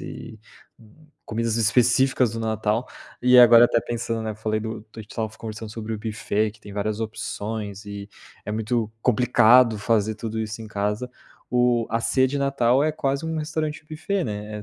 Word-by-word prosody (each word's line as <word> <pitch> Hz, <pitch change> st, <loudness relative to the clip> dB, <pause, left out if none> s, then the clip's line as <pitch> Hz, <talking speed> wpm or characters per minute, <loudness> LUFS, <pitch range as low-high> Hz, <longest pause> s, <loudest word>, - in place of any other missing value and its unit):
e 110 Hz, -, -9 dB, 0.9 s
comidas 115 Hz, 0 st, -2 dB
específicas 120 Hz, +2 st, +3 dB
do 115 Hz, -, -4 dB
Natal. 110 Hz, +1 st, -1 dB, 0.4 s
E 125 Hz, 0 st, +6 dB
agora 120 Hz, -1 st, +9 dB
até 115 Hz, -, +1 dB
pensando, 115 Hz, -1 st, -3 dB
né, 110 Hz, -, -3 dB
eu -, -, -13 dB
falei 110 Hz, 0 st, -2 dB
do 110 Hz, 0 st, -5 dB
do 105 Hz, -, -19 dB
a -, -, -5 dB
gente 105 Hz, -, -19 dB
estava 110 Hz, -2 st, -2 dB
conversando 110 Hz, -1 st, -7 dB
sobre 110 Hz, 0 st, -6 dB
o -, -, -6 dB
buffet 110 Hz, -1 st, -1 dB
que 105 Hz, 0 st, -20 dB
tem 105 Hz, -, -11 dB
várias 105 Hz, +1 st, -2 dB
opções 110 Hz, -2 st, -5 dB
e, 100 Hz, 0 st, -7 dB, 0.4 s
é 105 Hz, -, -4 dB
muito 110 Hz, 0 st, -1 dB
complicado 125 Hz, -1 st, +5 dB
fazer 110 Hz, 0 st, +1 dB
tudo 110 Hz, +1 st, -5 dB
isso 110 Hz, +1 st, -5 dB
em -, -, -8 dB
casa. 105 Hz, +4 st, -2 dB, 0.4 s
O 125 Hz, -2 st, +2 dB
a 115 Hz, +1 st, 0 dB
ceia 130 Hz, +2 st, +2 dB
de 140 Hz, -, -3 dB
Natal 135 Hz, -2 st, +2 dB
é 155 Hz, -, +1 dB
quase 140 Hz, -1 st, -2 dB
um 160 Hz, 0 st, -2 dB
restaurante 155 Hz, 0 st, -3 dB
buffet 175 Hz, +4 st, -2 dB
né, 105 Hz, 0 st, -5 dB
é 105 Hz, -, -8 dB
115 Hz, 190 wpm, -24 LUFS, 110-125 Hz, 0.9 s, agora